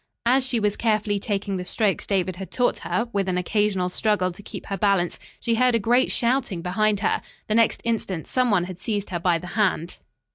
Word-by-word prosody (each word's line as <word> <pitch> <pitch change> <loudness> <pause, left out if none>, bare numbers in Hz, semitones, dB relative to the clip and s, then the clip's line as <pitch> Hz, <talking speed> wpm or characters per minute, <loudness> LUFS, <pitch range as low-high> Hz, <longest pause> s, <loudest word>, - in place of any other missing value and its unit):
As 255 +3 +4
she 255 -2 0
was 210 -1 +1
carefully 215 -2 +1
taking 200 -1 -2
the 180 - -4
strokes 200 +2 0
David 185 -2 0
had 190 0 -7
taught 245 -1 +1
her, 235 - -1
with 195 -2 0
an 180 - 0
occasional 195 0 +1
struggle 185 0 +1
to 175 - -12
keep - - -8
her 195 - -3
balance, 195 -3 +1 0.2
she 235 - 0
heard 250 +1 +3
a - - +3
great 240 +5 +3
shouting 235 -8 0
behind 205 +3 +1
her. - - +1 0.3
The 215 - 0
next 230 0 +3
instant, 200 -8 -2
some 255 -1 +1
one 200 -5 +3
had 180 0 -8
seized 205 -3 -2
her 175 - -1
by 170 0 +2
the 165 - -9
hand. 190 -5 0
205 Hz, 215 wpm, -24 LUFS, 185-230 Hz, 0.3 s, As